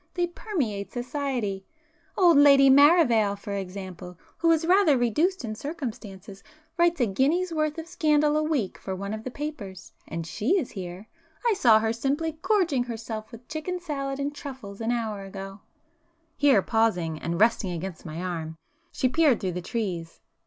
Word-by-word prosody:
They 350 -1 +1
permeate 290 - -3
society. 245 -6 -3 0.5
Old 350 -4 +6
Lady 280 -1 +7
Maravale, 265 - +5
for 200 0 -6
example, 185 -2 -7 0.2
who 335 - +3
is 325 0 +3
rather 355 -5 +4
reduced 295 - +1
in 215 - -4
circumstances, 215 - -7 0.3
writes 340 -1 +2
a - - +5
guinea's 300 - +1
worth 310 -1 -1
of 325 - -5
scandal 300 -3 +2
a 305 - +2
week 300 -11 -1
for 190 - -5
one 200 +2 -5
of 220 0 -6
the 255 - -4
papers. 245 - -7 0.2
And 165 0 -5
she 225 - 0
is 305 -10 -2
here,—I 270 - -5
saw 240 - +5
her 220 +1 0
simply 295 +6 -2
gorging 340 - +1
herself 225 -2 -6
with 235 +1 -12
chicken 320 +4 -4
salad 275 -5 -4
and 285 +1 -2
truffles 255 -9 -9
an 225 +1 0
hour 220 -4 -2
ago!" 195 0 -8 0.8
Here 275 -9 +4
pausing, 180 -9 0
and 170 +2 -3
resting 220 -3 +3
against 175 0 -6
my 165 +2 -6
arm, 160 -3 -4 0.3
she 260 - +1
peered 280 -3 +3
through 185 - -2
the 180 +1 -4
trees. 175 -6 -4
240 Hz, 165 wpm, -26 LUFS, 200-305 Hz, 0.8 s, Lady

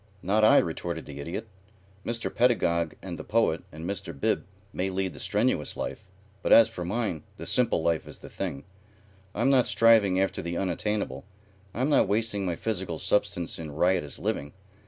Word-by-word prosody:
"Not 105 +4 +2
I," 110 - +7
retorted 85 0 -1
the 70 -1 -9
Idiot. 85 +9 -5 0.6
"Mr. 115 0 -3
Pedagog 85 -10 +2
and 90 -3 -6
the - - -5
Poet 105 -7 +1
and 80 +3 -7
Mr. 100 -7 -5
Bib - - 0 0.3
may 95 +1 -1
lead 95 -1 -2
the - - -11
strenuous 105 -4 0
life, - - -4 0.4
but - - -1
as 115 - +9
for 90 - -6
mine 95 -3 -2 0.2
the - - -7
simple 120 -9 +2
life 85 -1 0
is - - -9
the - - -11
thing. 75 -8 -5 0.7
I'm 130 +3 +2
not 130 -3 +4
striving 110 -5 +5
after 95 - 0
the 85 0 -3
unattainable. 95 -7 -2 0.5
I'm 130 +8 -1
not - - +4
wasting 105 -2 0
my 85 - -1
physical 95 -5 -3
substance 100 -2 -1
in 80 -2 -6
riotous 90 -3 +1
living. 70 +1 -3
95 Hz, 175 wpm, -27 LUFS, 85-110 Hz, 0.7 s, as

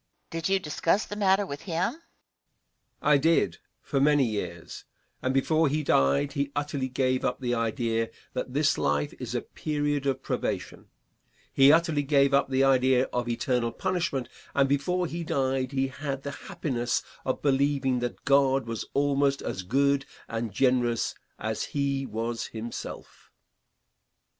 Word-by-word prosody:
Question. 165 - -3
Did 165 - -1
you 195 - +3
discuss 165 +4 0
the 205 - -6
matter 200 -1 +3
with 140 -5 -6
him? 170 -1 -1
Answer. 325 - -17 1.0
I 150 -1 +5
did 165 +3 +2 0.3
for 140 - -1
many 145 -1 +4
years, 100 -6 -5 0.4
and 130 - 0
before 155 +4 +2
he 150 +2 0
died 70 - +3
he 140 -1 -1
utterly 145 -2 -2
gave 130 0 0
up - - -1
the 125 -2 -1
idea 115 -1 0 0.2
that 125 0 -3
this 150 0 +2
life 75 0 0
is - - -5
a - - -1
period 145 -2 -2
of 135 -1 -1
probation. - - -3 0.7
He 135 +1 +7
utterly 160 -2 +3
gave 140 -1 +3
up 140 0 +3
the 135 0 +2
idea 130 -1 +4
of 120 -1 -1
eternal 120 0 0
punishment, 175 -9 -1 0.3
and 140 -1 +4
before 160 +7 +1
he 170 +1 -4
died 135 -5 0
he 135 -1 0
had 135 0 -5
the 140 - -4
happiness 140 -9 -2 0.2
of 130 - -2
believing 135 -2 +2
that 120 0 -5
God 135 -1 +4
was 115 -1 -4
almost 140 0 +2
as 95 - -3
good 135 +7 +1 0.2
and 115 -1 -3
generous 120 0 +1 0.2
as 110 0 -2
he 140 -1 0
was 115 +1 -3
himself. 115 +1 -8
135 Hz, 155 wpm, -27 LUFS, 125-145 Hz, 1.0 s, He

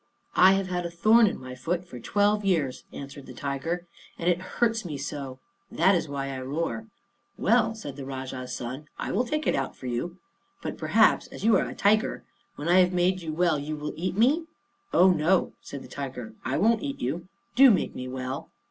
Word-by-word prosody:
"I 185 +1 +7
have 195 0 +1
had 180 -1 -2
a 170 - -3
thorn 215 +7 +5
in - - -2
my 130 0 -8
foot 170 +8 -2
for 125 -7 -9
twelve 205 - +2
years," 160 -10 0
answered 140 0 -9
the - - -10
tiger, 155 +5 -3 0.3
"and 170 - -3
it 175 0 +3
hurts 225 +4 0
me 155 -6 -5
so; 140 -2 -5 0.3
that 195 - +4
is 170 -3 +1
why 135 -1 -3
I 130 -1 -4
roar." 165 +11 -3 0.5
"Well," 225 0 +3
said 145 -11 -8
the 140 - -6
Rajah's 130 -1 -6
son, 130 +5 -6
"I - - -3
will 250 - +1
take 305 +5 -2
it - - +2
out 135 -1 -2
for - - -12
you. 125 +9 -3 0.5
But - - -3
perhaps, - - +4
as - - -10
you 225 - +6
are - - +1
a - - -8
tiger, 215 +2 +2 0.3
when 145 - -5
I 180 +2 +6
have 180 0 +4
made 180 +1 +2
you 160 -2 -4
well, 165 -1 +2
you 150 +2 -4
will 150 0 -5
eat 180 +3 -3
me?" 285 +9 +3 0.5
"Oh 185 +1 +6
no," 175 +2 +2
said 140 -1 -8
the - - -11
tiger, 130 -5 -6
"I 130 - -1
won't 225 +2 +3
eat 280 -1 -4
you. 160 +8 -3 0.3
Do 270 +2 +9
make 210 - +2
me 130 - -6
well." 130 +1 -5
170 Hz, 210 wpm, -27 LUFS, 135-195 Hz, 0.5 s, Do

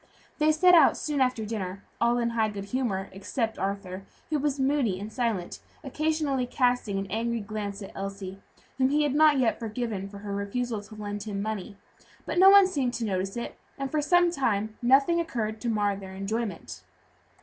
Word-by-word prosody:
They 305 +1 +4
set 360 +4 +5
out 320 -5 +6
soon 295 -3 -1
after 250 -4 +1
dinner, 200 -3 -4 0.2
all 235 +1 +3
in 235 -1 0
high 220 -2 +1
good 200 -1 -6
humor 200 -4 -2
except 225 +4 -3
Arthur, 195 -1 -3 0.3
who 305 - +2
was 285 -1 -1
moody 265 -8 +1
and 210 +2 -7
silent, 225 -8 -2 0.2
occasionally 295 -2 -1
casting 245 -5 +1
an 195 - -2
angry 230 +2 -1
glance 205 -1 -5
at 195 - -9
Elsie, 195 0 -6 0.4
whom 260 0 +4
he 300 +2 +2
had 290 -3 +1
not 305 -1 +5
yet 245 -4 +1
forgiven 220 -3 -4
for 200 - -10
her 200 0 -6
refusal 210 +3 -2
to 215 +1 -13
lend 205 -1 -5
him 205 -1 -4
money; 205 -1 -4 0.5
but - - -1
no 380 +1 +9
one 400 0 +9
seemed 275 -10 -1
to 230 - -2
notice 195 0 -2
it, 235 - -6 0.2
and 275 -1 -4
for 305 - +1
some 350 +3 +4
time 220 -8 -1
nothing 275 +7 +4
occurred 225 -10 -3
to 240 - -1
mar 205 -2 +1
their 190 -1 -9
enjoyment. 200 0 -4
225 Hz, 190 wpm, -27 LUFS, 200-270 Hz, 0.5 s, no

